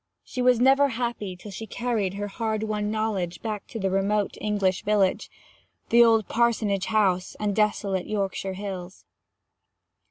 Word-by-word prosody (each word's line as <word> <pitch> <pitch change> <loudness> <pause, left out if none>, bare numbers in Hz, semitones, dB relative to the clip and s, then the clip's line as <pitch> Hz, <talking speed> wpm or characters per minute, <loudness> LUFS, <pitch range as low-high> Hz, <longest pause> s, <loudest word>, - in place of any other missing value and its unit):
She 255 - -5
was 250 -1 +4
never 270 +3 +5
happy 235 -6 -3
till 200 +3 -11
she 220 +4 -7
carried 215 -5 -1
her 205 +1 -3
hard 220 +1 -2
won 210 -1 -2
knowledge 210 -5 -2
back 215 -3 -4
to - - -7
the 195 -1 0
remote 200 +2 0
English 200 -3 0
village, 200 -2 +1 0.6
the 235 0 +7
old 225 -2 +4
parsonage 220 -5 +1
house, 190 -4 +1
and 205 -2 -1
desolate 205 -3 0
Yorkshire 195 -2 -2
hills. 190 -2 -7
210 Hz, 150 wpm, -25 LUFS, 195-225 Hz, 0.6 s, the